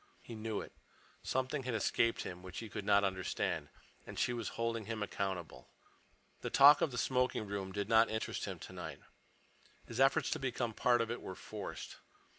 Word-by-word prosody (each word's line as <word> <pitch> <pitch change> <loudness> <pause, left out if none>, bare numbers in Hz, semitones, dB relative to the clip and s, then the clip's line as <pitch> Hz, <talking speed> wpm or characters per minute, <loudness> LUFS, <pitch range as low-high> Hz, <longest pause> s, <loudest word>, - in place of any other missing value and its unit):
He 120 - -9
knew 110 -1 -3
it. - - -9 0.5
Something 130 +2 -1
had 125 -2 -2
escaped 115 +2 +2
him 90 -1 -6
which 90 -1 -9
he 115 - -5
could 100 - -5
not 100 -1 +5
understand. 95 -1 -1 0.4
And - - -8
she 120 - +1
was 115 -2 -3
holding 115 -1 -1
him 110 -1 -3
accountable. 95 -10 -4 0.7
The - - -2
talk 145 +2 +8
of 160 - +3
the 125 - -6
smoking 125 -4 +1
room 100 -2 -4
did 100 0 -2
not 110 0 +5
interest 110 0 -2
him - - -5
tonight. - - -8 0.8
His 120 +1 -6
efforts 135 0 +4
to 160 - 0
become 125 -3 -1
a - - -15
part 120 +2 +3
of 115 0 -1
it 120 - -4
were 95 - -6
forced. - - -7
115 Hz, 190 wpm, -35 LUFS, 100-125 Hz, 0.8 s, talk